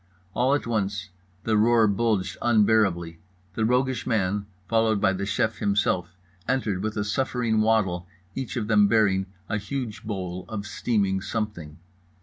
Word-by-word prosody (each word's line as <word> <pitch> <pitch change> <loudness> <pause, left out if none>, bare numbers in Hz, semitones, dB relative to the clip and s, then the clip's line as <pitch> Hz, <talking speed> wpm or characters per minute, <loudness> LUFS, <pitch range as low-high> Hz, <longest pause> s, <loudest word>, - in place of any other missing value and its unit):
All 130 +4 +2
at 145 - -2
once 100 -3 -2 0.3
the 110 - +1
roar 115 +1 +5
bulged 100 -1 0
unbearably. 105 -7 +2 0.3
The 110 +1 0
roguish 125 +1 +1
man, 100 -3 0 0.2
followed 110 -2 +2
by 95 -1 +3
the 100 +1 -3
chef 110 +1 0
himself, 95 -3 0 0.3
entered 115 -7 0
with 110 +1 -3
a 100 - +1
suffering 115 0 0
waddle, 95 -6 +1 0.3
each 125 -6 -4
of 110 -3 -2
them 105 -2 +5
bearing 100 -3 +2 0.2
a 105 - -1
huge 110 -1 -5
bowl 90 -4 -4
of 105 -2 -4
steaming 100 -2 0
something. 95 -7 -4
105 Hz, 145 wpm, -25 LUFS, 95-115 Hz, 0.3 s, roar